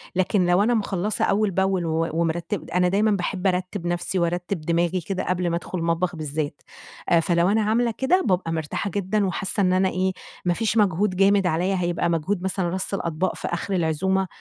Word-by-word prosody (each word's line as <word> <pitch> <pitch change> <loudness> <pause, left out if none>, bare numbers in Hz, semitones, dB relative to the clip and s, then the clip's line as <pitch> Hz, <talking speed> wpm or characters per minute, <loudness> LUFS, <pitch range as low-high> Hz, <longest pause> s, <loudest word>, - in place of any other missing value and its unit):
لكن 185 0 +2
لو 175 +3 +4
أنا 240 +3 +2
مخلّصة 210 -2 0
أول 210 0 +1
بأول 190 -1 +1
و 165 0 0
ومرتِّب 170 +3 -2
أنا 180 0 +2
دايمًا 205 +4 +2
باحِب 190 0 -1
أرتِّب 180 0 -2
نفسي، 175 +2 -1
وأرتِّب 175 +1 -1
دماغي 170 +3 0
كده 185 +3 -3
قبل 180 -1 0
ما 170 - 0
أدخُل 175 +2 -4
المطبخ 170 +2 0
بالذات. 155 -1 -4 0.5
آآ 170 - +5
فلو 170 +1 +2
أنا 220 +2 +3
عاملة 230 +3 +1
كده، 350 +8 +3
بابقى 180 -3 +1
مرتاحة 160 +5 -2
جدًا 200 +1 0
وحاسّة 195 +2 -2
إن 185 -1 +3
أنا 190 +1 +3
إيه، 185 +1 0 0.3
ما 175 - +3
فيش 225 +4 -1
مجهود 200 -1 +2
جامد 195 0 +4
عليّا، 180 +4 +1
هيبقى 175 -1 0
مجهود 170 +3 -1
مثلًا 190 -2 -1
رَص 190 +3 -3
الأطباق 175 -1 -1
في - - -5
آخر 175 +3 -3
العزومة 185 +3 +1
185 Hz, 190 wpm, -24 LUFS, 170-195 Hz, 0.5 s, آآ